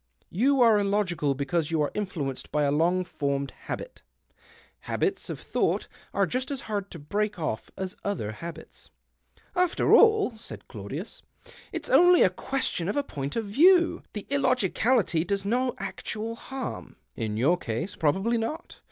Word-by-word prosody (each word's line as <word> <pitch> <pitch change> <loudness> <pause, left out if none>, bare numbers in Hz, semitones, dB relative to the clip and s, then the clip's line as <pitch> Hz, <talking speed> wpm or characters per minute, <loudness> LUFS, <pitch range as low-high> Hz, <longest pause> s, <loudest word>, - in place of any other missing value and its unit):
You 260 +7 +3
are 225 -3 +6
illogical 195 -8 +1
because 145 +3 -1
you 165 -1 0
are 145 - -1
influenced 160 -10 -4
by 150 0 +1
a 140 - +2
lono 175 +5 +2
formed 140 -5 -2
habit. - - -7 0.9
Haljits 390 -1 -1
of - - -4
thouo - - 0
ht - - -13 0.2
are - - +2
just 255 +1 -2
as 275 -3 -3
hard 205 -2 -3
to - - -9
break 205 +8 -2
off 155 -10 -3
as 190 +1 -4
other 185 - -2
habits." 165 +11 -10 0.3
" - - -47 0.3
After 360 -1 +2
all," 435 - +6
said 220 - -9
Claudius, - - -7 0.2
" - - -19
it's - - -4
only 355 0 +7
a 185 - +4
question 200 -5 -2
of 205 - -1
a 285 - +2
point 140 - -5
of 230 - -1
view^. 340 - +5
The 210 - -5
illogicality 250 - +2
does 200 +2 -2
no 250 +4 +1
actual 195 +4 -4
harm." 265 +2 -6
"' - - -48
In 105 0 -3
your 150 +10 +3
case 160 - -4
possibly 195 +10 +1
not. 305 +10 -5
200 Hz, 170 wpm, -27 LUFS, 165-255 Hz, 0.9 s, only